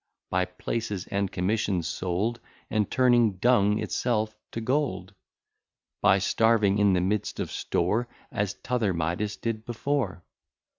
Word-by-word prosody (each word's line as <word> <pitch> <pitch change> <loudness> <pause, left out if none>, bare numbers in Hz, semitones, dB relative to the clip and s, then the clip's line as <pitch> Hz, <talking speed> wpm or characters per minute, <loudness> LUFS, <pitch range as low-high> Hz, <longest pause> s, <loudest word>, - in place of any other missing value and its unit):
By - - +2
places 105 -5 -4
and 100 -1 -1
commissions 95 -3 0
sold, 95 +8 -1 0.3
And 105 -3 +1
turning 120 -4 +4
dung 105 0 +3
itself 110 -2 -1 0.2
to - - -4
gold? 115 -7 -1 0.9
By 95 - +5
starving 105 0 +3
in 100 -2 +4
the 90 - +2
midst 100 +3 -1
of - - -3
store, 105 +8 0 0.2
As 100 0 -1
t'other 115 -7 -1
Midas 85 +6 -1
did 115 -2 -3
before? 120 -6 -2
105 Hz, 130 wpm, -27 LUFS, 95-115 Hz, 0.9 s, By